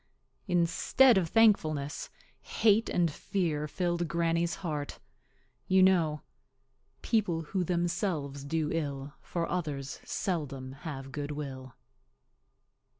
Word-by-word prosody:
Instead 180 +8 +4
of 180 -4 +1
thankfulness, 155 -11 +2 0.3
hate 220 +1 +2
and 170 -3 +2
fear 155 -3 -2
filled 175 +1 -1
Granny's 170 +1 0
heart. 150 -3 -3 0.7
You 190 0 +5
know— 165 -6 +3 0.8
People 195 -8 +1
who 185 +4 -1
themselves 170 -5 -1
do 155 +1 -1
ill 145 -3 -3
For 170 -1 -3
others 145 -6 -3
seldom 140 -8 -3
have 135 -1 -7
good 145 0 -4
will. 135 -4 -6
165 Hz, 100 wpm, -30 LUFS, 145-180 Hz, 0.8 s, You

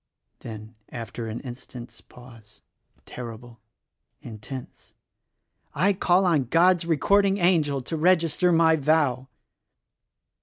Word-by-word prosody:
Then 110 0 -10 0.2
after 115 0 -7
an 110 +1 -6
instant's 120 -2 -10
pause, 115 -4 -17 0.4
terrible, 120 -1 -10 0.6
intense: 120 +4 -10 0.8
"I 190 +7 +2
call 185 0 +2
on 155 -7 +2
God's 170 +5 +3
Recording 195 +5 +2
Angel 155 -7 +1
to 165 - -5
register 170 +1 +2
my 165 -1 +4
vow." 140 -4 +1
145 Hz, 100 wpm, -24 LUFS, 120-170 Hz, 0.8 s, my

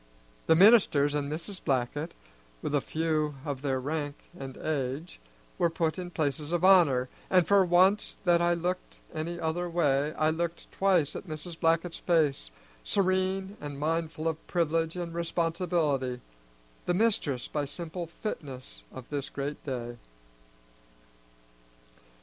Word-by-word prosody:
The 160 - +6
ministers 175 -7 +6
and 145 -1 -1
Mrs. 170 +5 -5
Blackett, 140 +5 -1 0.5
with - - -2
a 145 - +3
few 155 -1 -1
of 140 -3 -3
their 135 -2 0
rank 145 +1 -3 0.2
and 135 -4 -8
age, 145 +2 -3 0.4
were 170 - +4
put 165 +1 -1
in 180 -1 -5
places 150 -2 -2
of 175 0 0
honor, 165 -10 +6 0.2
and 180 -3 +4
for 200 +1 +6
once 185 +3 +3
that 175 -2 +4
I 175 0 +3
looked 180 +2 -3 0.2
any 170 +2 -4
other 170 +2 -1
way 150 -4 +2
I 155 0 +2
looked 170 +1 -3
twice 185 -7 +2
at - - -7
Mrs. 160 +2 -6
Blackett's 165 0 +1
face, 150 - +1 0.3
serene 190 - 0
and 145 -1 -6
mindful 160 +1 -1
of 160 0 -3
privilege 165 -1 0
and 175 -2 -4
responsibility, 165 -6 0 0.7
the 175 - +2
mistress 180 - +1
by 150 -1 -2
simple 170 +3 -6
fitness 135 - -7
of 130 - -10
this 140 -1 -3
great 140 +1 -5
day. 120 -3 -4
160 Hz, 140 wpm, -29 LUFS, 145-175 Hz, 0.7 s, The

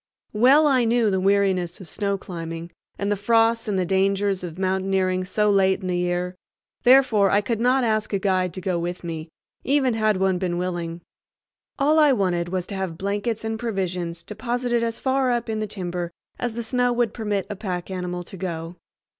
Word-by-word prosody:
Well 260 +8 +6
I 265 -4 +4
knew 230 -2 +2
the 190 - +1
weariness 190 -3 +1
of 190 - -10
snow 200 +4 -1
climbing, 165 -2 -7 0.3
and 200 +1 -1
the - - +3
frosts, 225 +3 +2
and 205 -2 0
the 185 - +1
dangers 195 +1 +1
of 175 -1 -6
mountaineering 190 -1 0
so 210 +3 +1
late 190 0 +3
in - - -6
the 180 -1 -1
year; 180 +1 -1 0.5
therefore 245 -6 +5
I 200 - +3
could 225 +1 -2
not 250 +2 +3
ask 215 -2 0
a 200 - +1
guide 185 -2 +1
to 185 - -5
go 180 -1 -1
with 175 +1 -4
me, 165 -1 -5 0.3
even 270 -2 +2
had 215 -2 +2
one 190 -1 +1
been 175 -2 -1
willing. 175 -1 -3 0.8
All 300 +3 +3
I 300 -3 +6
wanted 180 -6 0
was 185 -1 -2
to 200 - -6
have 190 -4 -3
blankets 205 +4 -2
and 220 0 -3
provisions 180 -6 -3
deposited 240 +4 -1
as 230 -1 -2
far 265 -1 +1
up 240 -1 -1
in 220 -1 -1
the 215 - -2
timber 180 -3 -4 0.3
as 240 -2 -2
the 235 - -3
snow 245 +1 +1
would 240 -2 0
permit 210 -4 -2
a 205 - -5
pack 185 -2 -4
animal 180 -1 -4
to 190 - -11
go. 170 -1 -5
195 Hz, 195 wpm, -23 LUFS, 180-225 Hz, 0.8 s, Well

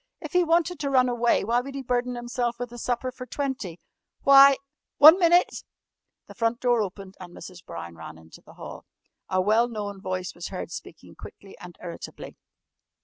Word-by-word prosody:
If - - -8
he 360 0 +4
wanted 335 0 +1
to 280 - -2
run 255 -2 +3
away, 240 -1 +1
why 235 +4 +1
would 275 +2 -9
he 275 - -5
burden 245 0 -1
himself 240 0 -3
with 245 -1 -6
a 240 - -8
supper 250 +2 -2
for 255 0 -10
twenty? 255 - -4 0.4
Why 275 0 +8 0.4
one 315 +5 +9
minute!" 345 0 +3 0.6
The - - -13
front 230 +1 -1
door 245 -2 +2
opened 195 -1 -6
and 175 -2 -11
Mrs. 180 -1 -11
Brown 85 0 -8
ran 80 -1 -10
into 80 0 -16
the - - -17
hall. - - -10 0.4
A 185 - +1
well 215 +5 +3
known 205 -4 -6
voice 185 0 -4
was 175 - -7
heard - - -7
speaking - - -10
quickly 195 -1 -13
and 180 -1 -12
irritably. 170 -1 -9
240 Hz, 185 wpm, -25 LUFS, 190-265 Hz, 0.6 s, one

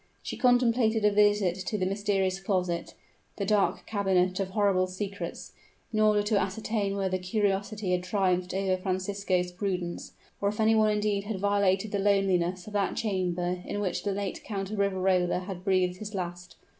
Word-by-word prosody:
She - - -4
contemplated 235 -3 +3
a 210 - +5
visit 205 -3 +3
to 210 - -1
the 185 - 0
mysterious 195 -1 0
closet 180 -3 -2 0.4
the 200 - -2
dark 205 0 +1
cabinet 190 -3 +1
of 195 -1 -1
horrible 190 -2 +2
secrets, 200 +2 -6 0.4
in 215 - +1
order 210 -1 +4
to 210 -1 +2
ascertain 200 +1 -2
whether 190 -1 0
curiosity 200 +1 -1
had 180 0 +1
triumphed 185 -1 0
over 190 -1 +1
Francisco's 185 -1 -1
prudence, 180 -2 -4 0.3
or 200 - +2
if 210 - -6
any 220 0 +4
one 215 -1 +4
indeed 210 -1 0
had 205 -2 -3
violated 200 0 +1
the 200 - 0
loneliness 190 -3 +1
of 210 - -10
that 200 -2 0
chamber 180 -4 -1
in 205 - -4
which 195 -3 -1
the 205 - -1
late 195 -1 -4
Count 195 -2 -4
of 215 - -3
Riverola, 185 -2 +1
had 185 -1 -7
breathed 185 -2 +1
his 210 +1 -7
last. 175 -1 -5
195 Hz, 170 wpm, -28 LUFS, 185-205 Hz, 0.4 s, a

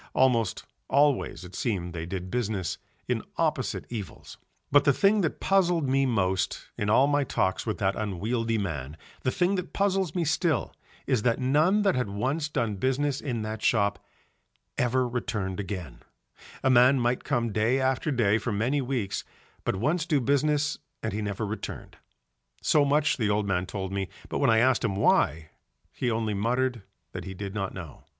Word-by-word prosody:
Almost 120 -6 +2 0.2
always 140 -8 +2
it 90 - -12
seemed 90 -6 -2
they 85 -1 -5
did 90 0 -5
business 110 -7 -2 0.3
in - - 0 0.2
opposite - - 0
evils. 105 -8 -7 0.3
But 145 0 +6
the 140 - +4
thing 200 +7 +3
that 160 - -1
puzzled 175 -6 +2
me 135 +1 +2
most 95 -5 0
in 105 - -2
all 125 +5 +5
my 145 0 +2
talks 95 -5 -1
with 105 -4 -1
that 95 -1 0
unwieldy 110 +3 -1
man, 75 -7 -4 0.2
the - - +1
thing 180 +8 +1
that 180 0 -5
puzzles 195 -4 +1
me 175 -2 +1
still, 155 -3 0 0.3
is 130 -5 +1
that 115 +1 +2
none 155 +11 +3
that 195 - +3
had 125 -5 -1
once 135 +10 -1
done 110 -8 -1
business 135 +5 0
in 120 -6 -3
that 110 0 -5
shop 100 -3 +1 0.7
ever 125 +1 +1
returned 105 -6 -3
again; 90 - -5 0.6
a 130 - +3
man 130 +2 +6
might 120 +1 0
come 120 -5 0
day 115 +5 +2
after 130 +2 0
day 115 -6 +2
for 115 - -3
many 120 +8 +1
weeks, 120 -7 -2 0.4
but - - 0
once 155 - 0
do 150 -4 +3
business 145 +3 +1 0.2
and 110 - -2
he 105 - -2
never 105 +1 -2
returned; 105 +2 -6 0.6
so 150 - +3
much 145 +1 +2
the 110 -5 0
old 105 0 +1
man 95 -2 0
told 95 -1 -4
me, 95 -2 -2 0.2
but - - -2
when - - +3
I 115 - +5
asked 125 +2 +3
him 105 -5 0
why, 80 -5 +2 0.4
he 125 - -1
only 110 -2 -1
muttered 120 +3 0 0.3
that - - -6
he 95 - -6
did 100 0 -5
not 100 -2 -2
know. 85 -6 -9
120 Hz, 180 wpm, -27 LUFS, 100-140 Hz, 0.7 s, But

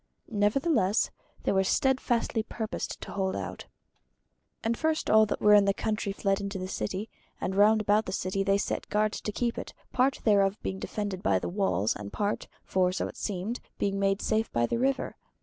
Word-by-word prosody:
Nevertheless 210 - +2 0.3
they - - +1
were 190 -1 +3
steadfastly 240 0 +1
purposed 220 0 -4
to - - -7
hold 190 -1 -1
out. - - -5 1.0
And 225 +1 +1
first 315 +4 0
all 220 0 +6
that - - -2
were 210 0 +6
in 205 -1 +7
the 200 0 +2
country 215 -2 -1
fled 195 0 0
into 200 0 -4
the 185 0 -4
city, 195 +2 -3 0.3
and 190 - -2
round 215 +2 +5
about 210 +1 +2
the - - -3
city 190 +1 -1
they 195 0 +3
set 200 - -3
guards 215 +1 +1
to 210 - -3
keep 235 +2 -1
it, - - -8 0.2
part 260 +1 +2
thereof 200 -2 +3
being 190 - -3
defended 200 -3 -4
by 95 - +3
walls, 175 - 0
and 100 -1 -7
part, 205 0 -2 0.2
for 185 -1 +2
so 185 - -2
it - - -10
seemed, 205 +4 -3 0.2
being 195 -1 0
made 195 0 +1
safe 220 0 0
by 120 0 +2
the 230 - -1
river. 265 +1 0
205 Hz, 190 wpm, -29 LUFS, 195-220 Hz, 1.0 s, in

